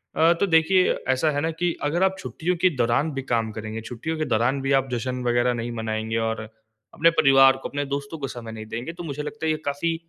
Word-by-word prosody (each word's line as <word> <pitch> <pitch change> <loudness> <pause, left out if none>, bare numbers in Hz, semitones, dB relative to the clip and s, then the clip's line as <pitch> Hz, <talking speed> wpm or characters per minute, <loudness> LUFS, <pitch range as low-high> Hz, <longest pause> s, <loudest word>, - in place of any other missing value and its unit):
अ, 165 +2 +5
तो 200 - +2
देखिए 180 +3 +4 0.2
ऐसा 130 +4 +2
है 145 0 -1
ना 165 +2 0
कि 170 +1 -1
अगर 165 +5 +1
आप 190 0 +2
छुट्टियों 180 -1 -2
के 185 - +5
दौरान 125 +6 +1
भी 135 - -3
काम 115 -3 -1
करेंगे, 110 +1 -6
छुट्टियों 125 +8 -5
के 155 - -1
दौरान 125 +2 +1
भी 135 +1 -1
आप 135 0 -5
जश्न 125 +1 -3
वग़ैरह 120 0 +2
नहीं 120 0 -4
मनाएँगे 110 0 -3
और 115 -1 -1 0.5
अपने 165 +2 +4
परिवार 135 -4 +5
को, 135 - -6
अपने 145 0 -3
दोस्तों 140 +3 -4
को 135 - -3
समय 120 -3 -8
नहीं 110 -1 -8
देंगे 120 +8 -5
तो 175 +1 -8
मुझे 150 -2 -4
लगता 190 +2 -5
है 160 - +2
ये 155 - 0
काफ़ी 145 +4 -1
135 Hz, 240 wpm, -24 LUFS, 120-160 Hz, 0.5 s, अ